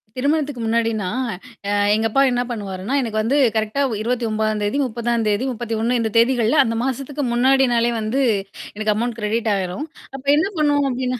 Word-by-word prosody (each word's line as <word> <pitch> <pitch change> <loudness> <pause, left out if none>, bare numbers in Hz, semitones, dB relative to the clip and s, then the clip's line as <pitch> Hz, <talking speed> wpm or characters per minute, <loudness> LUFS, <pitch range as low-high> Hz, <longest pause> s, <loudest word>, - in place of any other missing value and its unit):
திருமணத்துக்கு 285 -1 0
முன்னாடின்னா, 225 -3 0 0.6
அ - - 0 0.2
எங்கப்பா 225 +4 +1
என்ன 245 0 +1
பண்ணுவாருன்னா, 200 -1 -4
எனக்கு 225 -4 -3
வந்து 230 +6 0 0.2
கரெக்ட்டா 220 +5 0
ஒ - - -2
29ம் 220 -2 -1
தேதி, 205 +6 0
30ம் 235 -1 -1
தேதி, 210 +3 +1
31 235 0 -1
இந்த 225 -1 0
தேதிகள்ல 235 +3 +3
அந்த 230 -2 -2
மாசத்துக்கு 275 +3 -3
முன்னாடினாலே 245 -1 +3
வந்து 220 +5 -1 0.5
எனக்கு 215 0 0
அமௌண்ட் 235 +1 -2
கிரெடிட் 220 +1 -1
ஆயிரும். 190 +8 -3 0.3
அப்ப 270 0 -9
என்ன 320 - +2
பண்ணுவோம்? 290 -2 +2
அப்டின்னா, 250 0 -2
235 Hz, 155 wpm, -21 LUFS, 220-260 Hz, 0.6 s, தேதிகள்ல